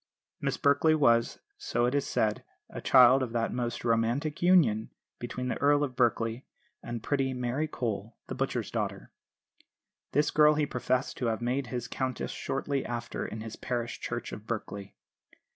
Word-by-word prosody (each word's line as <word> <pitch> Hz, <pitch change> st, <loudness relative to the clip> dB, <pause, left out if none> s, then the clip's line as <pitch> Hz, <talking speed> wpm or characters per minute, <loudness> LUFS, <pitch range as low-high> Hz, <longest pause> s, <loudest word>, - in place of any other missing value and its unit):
Miss -, -, -1 dB
Berkeley 150 Hz, +3 st, +4 dB
was, 115 Hz, -6 st, +3 dB, 0.2 s
so 120 Hz, -, 0 dB
it 125 Hz, -, 0 dB
is 145 Hz, -1 st, 0 dB
said, 105 Hz, -1 st, 0 dB, 0.3 s
a -, -, -6 dB
child 130 Hz, +1 st, +7 dB
of 120 Hz, -3 st, -3 dB
that 115 Hz, -1 st, 0 dB
most 120 Hz, -1 st, -3 dB
romantic 120 Hz, +6 st, 0 dB
union 155 Hz, -12 st, +4 dB, 0.3 s
between 125 Hz, +1 st, -4 dB
the -, -, -2 dB
Earl 145 Hz, +1 st, +4 dB
of 130 Hz, -3 st, -3 dB
Berkeley 115 Hz, 0 st, +1 dB, 0.4 s
and 120 Hz, -2 st, -6 dB
pretty 135 Hz, -2 st, 0 dB
Mary 125 Hz, +5 st, -1 dB
Cole, 110 Hz, -5 st, -4 dB
the -, -, -6 dB
butcher's -, -, -2 dB
daughter. -, -, -3 dB, 1.0 s
This 145 Hz, +2 st, +2 dB
girl 150 Hz, 0 st, +5 dB
he 150 Hz, 0 st, +1 dB
professed 130 Hz, -1 st, -1 dB
to 125 Hz, -, -1 dB
have 110 Hz, -1 st, 0 dB
made 125 Hz, +2 st, -1 dB
his 125 Hz, 0 st, -4 dB
countess 130 Hz, 0 st, -3 dB
shortly 135 Hz, 0 st, -2 dB
after 120 Hz, 0 st, -4 dB
in 110 Hz, -, -6 dB
the 115 Hz, 0 st, -7 dB
parish 120 Hz, -2 st, -3 dB
church -, -, -4 dB
of 105 Hz, +2 st, -9 dB
Berkeley. 100 Hz, -3 st, -5 dB
125 Hz, 165 wpm, -29 LUFS, 115-140 Hz, 1.0 s, child